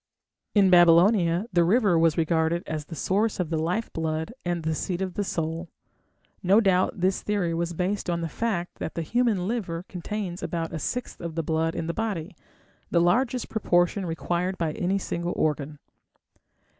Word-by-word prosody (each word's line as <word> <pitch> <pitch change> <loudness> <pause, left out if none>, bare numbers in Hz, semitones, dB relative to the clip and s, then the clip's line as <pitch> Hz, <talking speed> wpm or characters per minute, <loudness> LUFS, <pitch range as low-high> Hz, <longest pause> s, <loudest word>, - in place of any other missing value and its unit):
" - - -58
In 195 -2 +5
Babylonia 175 +1 +5
the 175 -1 +4
river 200 +1 +3
was 165 -1 +3
regarded 165 +1 +1
as 155 -1 -4
the 165 - -8
source 205 +6 0
of 175 -3 -2
the 160 - 0
life 180 +8 -2
blood 160 +5 -2
and 175 -2 -2
the 160 0 0
seat 175 +3 -2
of 190 -2 -3
the 205 - -1
soul. 165 -1 -3 0.7
No 195 +3 +5
doubt 190 -3 +2
this 185 +1 +1
theory 200 -5 -1
was 170 +1 -2
based 185 +3 -2
on 170 -1 0
the 165 - -2
fact 180 -1 -3
that - - -4
the 165 - -2
human 215 -1 +1
liver 185 -7 -3
contains 185 0 -5
about 165 -1 -3
a 160 - -3
sixth 250 - -4
of 170 -2 -5
the 165 - -1
blood 160 +1 0
in - - -2
the 170 - -2
body, 205 -5 -3 0.5
the 170 - +3
largest 235 +8 +2
proportion 180 -2 +1
required 175 +3 -2
by 165 -3 -1
any 185 +5 0
single 175 -2 -3
organ. 150 -1 -1
175 Hz, 180 wpm, -26 LUFS, 165-195 Hz, 0.7 s, In